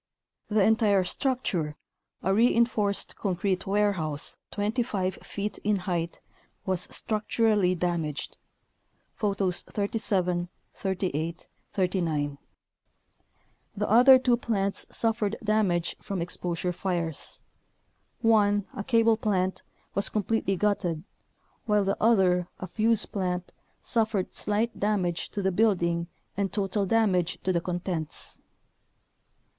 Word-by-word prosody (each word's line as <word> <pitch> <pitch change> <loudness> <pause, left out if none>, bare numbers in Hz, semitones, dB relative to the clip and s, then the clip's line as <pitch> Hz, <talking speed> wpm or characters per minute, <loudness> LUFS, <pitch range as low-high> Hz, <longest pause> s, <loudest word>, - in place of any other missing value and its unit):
The 210 -2 +3
entire 210 -3 +4
structure, 180 - -1 0.5
a 190 - +2
reinforced 225 -2 +2
concrete 185 -1 -1
warehouse 190 -7 0
25 205 -3 -1
feet 205 +1 -4
in 210 0 +2
height, 175 -3 -2 0.5
was 185 -2 -1
structurally 215 -3 +1
damaged 165 -4 -2 0.7
(Photos 195 -3 0
37, 185 -4 -1 0.2
38, 180 -4 -3 0.3
39). 165 -7 0 1.4
The 210 - 0
other 250 +5 +8
two 250 -2 +2
plants 200 -4 -1
suf 225 0 +1
fered 210 0 0
damage 200 -6 +1
from 195 -2 -4
exposure 175 +1 -2
fires. 170 -3 -3 0.8
One, 205 -3 +4
a 215 -6 -4
cable 230 -1 +3
plant, 190 -4 0 0.3
was 200 - +2
completely 210 -1 0
gutted, 180 -5 0 0.6
while 210 -1 +3
the 195 0 0
other, 185 -6 +4
a - - -4
fuze 220 +4 +2
plant, 180 -2 -3 0.3
suffered 220 -5 0
slight 220 +3 -1
damage 190 -5 0
to 200 - -4
the 190 - +2
building 175 -4 +2 0.3
and 200 -1 -1
total 200 -1 0
damage 185 -6 +2
to 185 - +1
the 170 - +1
contents. 175 -3 -3
195 Hz, 105 wpm, -27 LUFS, 180-215 Hz, 1.4 s, other